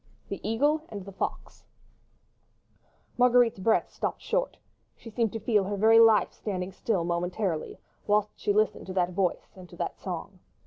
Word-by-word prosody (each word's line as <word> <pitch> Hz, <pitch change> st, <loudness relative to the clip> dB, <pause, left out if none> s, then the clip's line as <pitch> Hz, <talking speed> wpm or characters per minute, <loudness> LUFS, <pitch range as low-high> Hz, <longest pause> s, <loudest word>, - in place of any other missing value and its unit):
THE 200 Hz, -, -4 dB
EAGLE 285 Hz, +9 st, +1 dB
AND 200 Hz, -3 st, -7 dB
THE 195 Hz, -, -9 dB
FOX 195 Hz, -, -5 dB, 1.6 s
Marguerite's 245 Hz, -3 st, +4 dB
breath 220 Hz, +4 st, +1 dB
stopped -, -, -3 dB
short; -, -, -1 dB, 0.4 s
she 230 Hz, -, -12 dB
seemed 225 Hz, -1 st, 0 dB
to 225 Hz, -, -3 dB
feel 210 Hz, -2 st, +1 dB
her 200 Hz, +1 st, -3 dB
very 225 Hz, +3 st, +6 dB
life 225 Hz, -2 st, +5 dB
standing 185 Hz, -3 st, -4 dB
still 190 Hz, -1 st, -1 dB
momentarily 175 Hz, 0 st, -2 dB, 0.3 s
whilst 210 Hz, 0 st, +2 dB
she -, -, -1 dB
listened 215 Hz, -1 st, +1 dB
to 185 Hz, -, -5 dB
that 180 Hz, -1 st, +1 dB
voice 180 Hz, 0 st, -1 dB
and 185 Hz, -2 st, -12 dB
to -, -, -13 dB
that -, -, -4 dB
song. 185 Hz, +1 st, -6 dB
205 Hz, 165 wpm, -28 LUFS, 185-225 Hz, 1.6 s, very